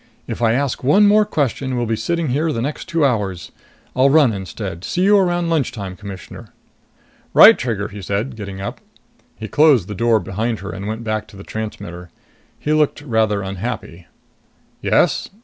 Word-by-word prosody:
"If - - -6
I 115 -1 +3
ask 135 0 -1
one 200 +11 +5
more 210 +1 +5
question, 135 - -1
we'll 120 - 0
be 115 0 0
sitting 170 +5 -1
here 155 +5 0
the 115 - -3
next 140 +5 -4
two 165 -3 +2
hours. 100 -9 -1 0.4
I'll 130 +2 +4
run 140 -5 +5
instead! 95 -2 -6
See 180 - -1
you 205 +2 +5
around 175 -3 +1
lunchtime, 105 - -2
Commissioner!" 100 -2 -10 0.9
"Right, - - +10
Trigger," 110 -4 -2
he 105 -1 -9
said, 100 +7 -3
getting 100 -3 -7
up. 100 - -6 0.5
He 110 +4 -7
closed 145 - +4
the 105 - -5
door 115 +2 +2
behind 110 +4 -2
her 100 - -6
and 95 +3 -6
went 110 +2 -4
back 110 -1 -2
to 100 - -14
the 100 - -10
transmitter. 90 -6 -7 0.5
He 150 - -1
looked 150 -1 +1
rather 110 -6 +1
unhappy. 95 -3 -6 0.7
"Yes?" - - +2
115 Hz, 175 wpm, -19 LUFS, 100-145 Hz, 0.9 s, Right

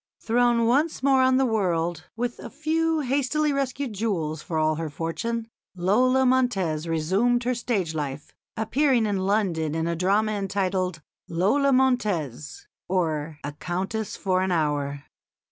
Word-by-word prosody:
Thrown 235 0 +2
once 280 +5 +1
more 270 -1 +4
on 260 0 +4
the 265 - +3
world, 175 - 0
with 240 +1 -3
a - - -8
few 320 0 0
hastily 285 +3 +1
rescued 275 -2 -2
jewels 170 -8 -2
for 160 - -4
all 155 0 +2
her 160 0 -3
fortune, 225 +10 -3 0.3
Lola 250 +9 +3
Montez 195 -12 +1
resumed 190 +10 +1
her 250 +1 +1
stage 220 -9 -1
life, 145 -2 -5 0.2
appearing 245 +2 +2
in 205 -2 0
London 170 -7 0
in 165 0 -1
a 170 0 -1
drama 200 +5 +2
entitled 190 -4 -1 0.2
"Lola 215 +12 +2
Montez: 215 - 0 0.2
or 160 -4 -1
a 145 - -4
Countess 185 +7 -3
for 185 -2 0
an 190 0 0
Hour." 145 -4 -1
200 Hz, 145 wpm, -25 LUFS, 165-250 Hz, 0.3 s, more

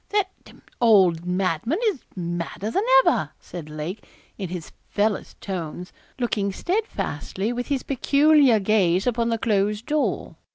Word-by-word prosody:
'That 405 -2 +1
d - - -15
d - - -19 0.2
old 185 -7 +5
madman 185 - 0
is 360 -11 -5
madder 175 +3 -4
than 390 - +1 0.2
ever,' - - +2
said 165 -4 -9
Lake, 155 +7 -5 0.3
in 190 -4 -5
his 175 -2 -6 0.2
fellest 210 0 -1
tones, 180 -2 -5 0.2
looking 215 -5 0
steadfastly 225 - -2
with 245 0 -3
his 280 -3 -1
peculiar 280 -2 +4
gaze 190 -3 +2
upon 235 -1 +1
the 230 - +1
closed 210 0 0
door. 300 0 -1
210 Hz, 140 wpm, -24 LUFS, 180-245 Hz, 0.3 s, old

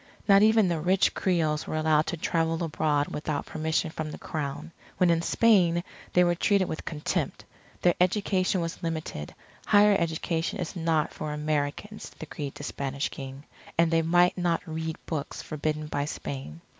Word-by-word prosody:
Not 200 -1 +7
even 220 -1 +5
the 170 -2 0
rich 185 +4 +3
Creoles 160 -5 0
were - - -3
allowed 155 0 +2
to 170 - -2
travel 165 +1 0
abroad 150 -2 0
without 150 -1 -3
permission 160 0 -1
from 155 -1 -4
the - - -7
Crown. 150 +1 -5 0.3
When 180 -2 +4
in 165 0 +2
Spain 175 -5 +3 0.3
they 180 - +6
were 175 0 +3
treated 190 +2 +2
with 155 - -5
contempt. 155 -2 -2 0.4
Their 175 - +5
education 185 -1 +2
was 165 +2 -4
limited, 160 - -4 0.3
higher 205 0 +6
education 165 +1 -1
is 180 0 -4
not 160 -3 0
for 155 - -4
Americans, 150 +7 -2
decreed 145 -2 -6
the - - -8
Spanish 140 0 -3
King. 135 0 -8 0.3
And 165 0 +4
they 165 0 +4
might 175 +2 +4
not 175 -2 0
read 160 -1 -4
books 150 -3 -4
forbidden 155 0 -2
by 145 -1 -2
Spain. 130 - -6
160 Hz, 165 wpm, -27 LUFS, 150-175 Hz, 0.4 s, Not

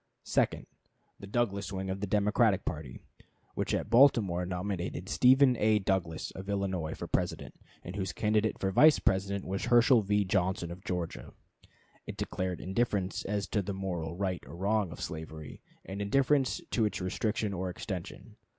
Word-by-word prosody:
Second. - - +1 0.5
The 100 - -9
Douglas 100 -3 -1
wing 95 -1 -3
of 95 - -4
the 100 - -3
Democratic 105 0 +2
party, 75 -5 -5 0.5
which - - -2
at - - -3
Baltimore 110 -9 +4
nominated 90 -1 -3
Stephen 130 +3 +5
A. 110 0 +3
Douglas, 95 -5 -1
of 95 +1 -9
Illinois, 95 -5 -2
for - - -6
President, - - -2 0.3
and 90 - -7
whose 95 -3 -2
candidate 105 +1 +1
for 95 - -1
Vice 155 +10 +6
President 100 +1 0
was 95 +3 -3
Herschel 120 0 +5
V. 105 0 +1
Johnson, 95 -1 0
of 90 +2 -9
Georgia. 90 -3 -4 0.7
It - - -6
declared 90 -1 -3
indifference 100 -1 -1
as 100 -1 -1
to 105 - +1
the 100 0 -4
moral 85 -4 -4
right 95 -1 -2
or - - -9
wrong 100 0 0
of - - -9
slavery, 80 -1 -7 0.2
and 95 +1 -5
indifference 135 +5 +2
to 115 - +2
its 105 - -2
restriction 105 +3 -1
or 95 0 -3
extension. 90 0 -7
95 Hz, 160 wpm, -30 LUFS, 90-105 Hz, 0.7 s, Vice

